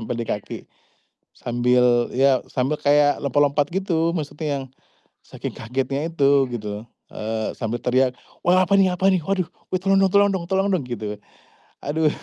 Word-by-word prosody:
nempel 115 +1 -4
di 115 - -3
kaki. 105 -2 -5 0.7
Sambil, 120 0 +2
ya 135 0 +3
sambil 130 +3 0
kayak 145 0 +3
lompat-lompat 145 +1 +1
gitu, 170 -3 0
maksudnya 155 0 -4 0.2
yang - - -8 0.6
saking - - -7
kagetnya 135 +5 -3
itu 140 -4 +3
gitu. 105 -2 -6 0.2
Eee 110 0 -3
sambil 115 0 -3
teriak, 125 0 +2 0.3
"Wah 185 +1 +4
apa 190 +2 +2
nih 190 -1 +4
apa 190 +2 +3
nih, 185 - +2
waduh. 190 -1 -1 0.2
Eh, 185 - 0
tolong 195 +1 +2
dong 195 -1 +3
tolong 200 +1 +5
dong 185 -3 -3
tolong 190 +2 +1
dong!" 180 -7 0
gitu. 105 -4 -5 0.6
Aduh, 155 +2 +1
140 Hz, 160 wpm, -22 LUFS, 120-175 Hz, 0.7 s, tolong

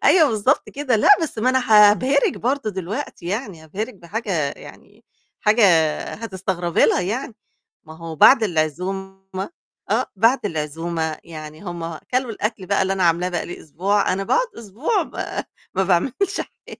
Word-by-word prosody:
أيوه، 320 -5 +6
بالضبط 225 +5 +1
كده، 270 -5 0
لأ، 215 - +3
بس 290 -8 -4
ما 250 +4 +3
أنا 260 -3 +1 0.2
هابهرك 265 +6 +1
برضه 255 -2 -1
دلوقتي 190 +1 -5
يعني، 195 -5 -4
هابهرك 210 +9 -5
بحاجة 180 -5 -2
يعني - - -15 0.4
حاجة 215 +1 +4 0.5
هتستغربي 190 -5 -1
لها - - +3
يعني، 225 +7 -3 0.5
ما 160 -1 -12
هو 165 -1 -7
بعد 260 - +7
العزومة 190 +2 -2 0.7
آه، - - +2
بعد 230 +3 +3
العزومة 160 -1 -3
يعني 155 -1 -9
هم 170 -3 -5
كلوا 255 -1 0
الأكل 210 -3 -3
بقى 200 0 +2
اللي 190 0 0
أنا 190 -1 -1
عاملاه 170 +1 +2
بقى 175 -2 -3
لي 175 - -8
أسبوع، 195 +7 0
أنا 195 +1 -2
باقعد - - +2
أسبوع 240 - -1
ما - - -5 0.3
ما 190 - +2
باعملش 265 - 0
حاجة. - - -10
195 Hz, 155 wpm, -21 LUFS, 170-235 Hz, 0.7 s, بعد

